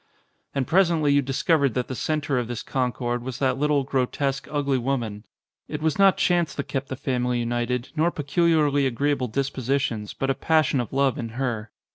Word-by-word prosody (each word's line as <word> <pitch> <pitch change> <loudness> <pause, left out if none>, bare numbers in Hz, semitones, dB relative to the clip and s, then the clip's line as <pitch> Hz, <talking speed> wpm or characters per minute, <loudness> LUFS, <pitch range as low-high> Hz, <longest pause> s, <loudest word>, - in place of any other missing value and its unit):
And 135 -2 0
presently 165 -4 +3
you 145 - +4
discovered 140 0 +1
that 125 -1 -1
the - - -4
centre 145 0 -1
of 120 - -3
this 120 -1 -5
concord 120 -2 -1
was 125 0 -5
that 130 -1 0
little, 150 -1 +2
grotesque, 135 +1 -1
ugly 140 -3 0
wo 135 +3 0
man; 110 -3 -6 0.4
it 150 - -4
was 160 +3 0
not 195 -1 +6
chance 175 -3 +1
that 140 - -4
kept 135 -1 -3
the 130 - -4
family 125 -1 -1
united, 120 +1 -1
nor 160 +2 +3
peculiarly 150 -2 +2
agreeable 135 +1 0
dispositions, 130 -3 -2
but 135 0 0
a - - +2
pas 155 +2 +2
sion 135 - 0
of 120 - -3
love 135 -1 +1
in 115 - -4
her. 115 -5 -2
135 Hz, 190 wpm, -24 LUFS, 125-145 Hz, 0.4 s, not